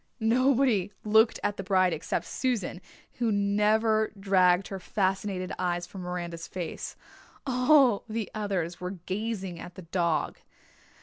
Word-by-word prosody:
Nobody 240 -3 +3
looked 220 +2 +4
at 205 - -1
the 195 - -4
bride 185 -2 +3
except 155 - -2
Susan, 225 -8 -2 0.4
who 235 -2 +1
never 215 +2 +2
dragged 185 -2 +3
her 195 - -5
fascinated 190 -1 -1
eyes 175 -1 -1
from 190 +1 -9
Miranda's 175 -2 -5
face 175 -3 -5 0.5
all 255 -3 +4
the 220 -1 -2
others 190 -6 -2
were 180 +1 -4
gazing 195 -3 -3
at 180 - -9
the 185 - -9
dog. 170 -1 -1
195 Hz, 130 wpm, -28 LUFS, 180-220 Hz, 0.5 s, looked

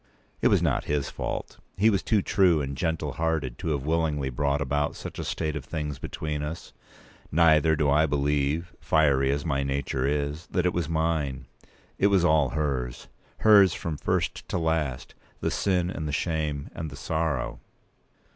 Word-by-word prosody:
It - - +5
was - - +3
not - - +1
his 75 -1 -1
fault. - - -5 0.2
He 110 +3 +5
was 100 - +1
too 105 -4 +1
true 90 -5 +3
and 70 -1 -3
gentle 80 0 -1
hearted 80 -6 -1
to - - -5
have 70 -4 -1
willingly 75 -4 0
brought 70 +3 0
about 75 +1 -1
such - - -8
a - - -2
state 80 -1 -2
of 75 - -4
things 75 -1 -4
between 75 -1 -4
us. 75 +3 -6 0.6
Neither 80 0 +5
do 75 -1 +1
I 75 +3 +4
believe—fiery 70 -1 +1
as 70 +1 -1
my 70 0 0
nature 70 -1 -1
is—that 75 +5 -1
it 90 - +2
was 85 -4 -1
p. 80 - -3
195mine. 80 -5 0 0.6
It 100 - +5
was 95 -3 +3
all 75 -5 +4
hers—hers 75 - +2
from 80 -2 -4
first - - -2
to - - -1
last—the 80 -6 -3
sin, 90 -2 +1
and 80 -5 -4
the - - -2
shame, 75 -3 -2
and 80 - -5
the 70 - -9
sorrow. 70 -7 -2
75 Hz, 165 wpm, -26 LUFS, 70-80 Hz, 0.6 s, It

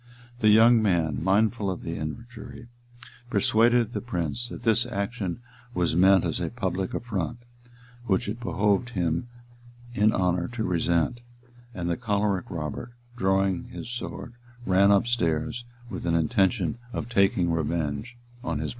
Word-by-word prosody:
The 110 - +4
young 115 +2 +7
man, 80 -8 +1
mindful 105 +2 +2
of 95 - -4
the 85 - -4
injury, 115 +9 -7 0.6
persuaded 115 +1 +3
the - - -2
prince 105 +1 -3
that 120 - -8
this 115 +1 +2
action 100 -2 -3 0.3
was 85 -2 +1
meant 95 +1 +5
as - - -1
a - - -2
public 95 -5 -3
affront, 100 -7 -3 0.7
which 95 -1 +1
it 110 +3 -4
behoved 105 0 +1
him 85 +5 0 0.7
in 110 -2 +4
honor 90 -2 +1
to 115 -2 -2
resent; 85 +3 +1 0.6
and 85 -2 -3
the 85 - 0
choleric 105 -5 0
Robert, 85 - -5 0.2
drawing 95 -3 +1
his 120 - -8
sword, 120 0 -6 0.3
ran 95 +1 +4
up 100 0 +4
stairs, 120 +1 -1 0.2
with 95 -6 -6
an 85 - +2
intention 100 +3 +1
of - - -3
taking 100 -6 +2
revenge 80 - -2 0.3
on 85 -10 -2
his - - -4
brothers. 75 -1 -2
100 Hz, 145 wpm, -26 LUFS, 85-115 Hz, 0.7 s, young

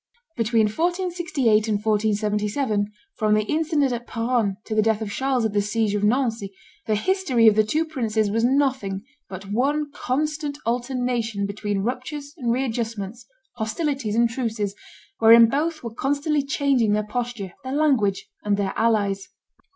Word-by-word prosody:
Between 230 -1 +2
1468 335 - +1
and 215 - +1
1477, 210 +1 0 0.3
from 215 -1 +2
the 215 - +2
incident 305 0 +1
at 240 0 -5
Peronne 230 -4 0
to 220 - -4
the 215 - +3
death 220 0 +2
of 215 -2 -4
Charles 265 0 0
at 215 - -1
the 205 - +2
siege 210 0 0
of 205 0 -1
Nancy, 225 -3 +1 0.4
the 215 - +2
history 280 - +2
of 220 - +8
the 215 +1 +4
two 310 +10 0
princes 220 -9 -1
was 225 +2 +1
nothing 255 -7 +1 0.3
but 195 +1 -8
one 290 +6 0
constant 295 +2 -2
alternation 240 -3 -1
between 200 -1 -2
ruptures 280 +5 -4
and 245 -8 -1
re 255 +3 +1
adjustments, 225 -1 -4 0.3
hostilities 240 0 -2
and 235 +1 +4
truces, 225 -5 -2 0.5
wherein 230 +1 +8
both 310 +5 -1
were 230 -2 -6
constantly 285 +4 0
changing 275 -6 +1
their 210 0 0
posture, 235 -4 -4
their 260 0 -4
language, 265 -10 +1 0.2
and 205 -1 +1
their 195 -1 -1
allies. 205 -4 +1
230 Hz, 155 wpm, -23 LUFS, 210-275 Hz, 0.5 s, of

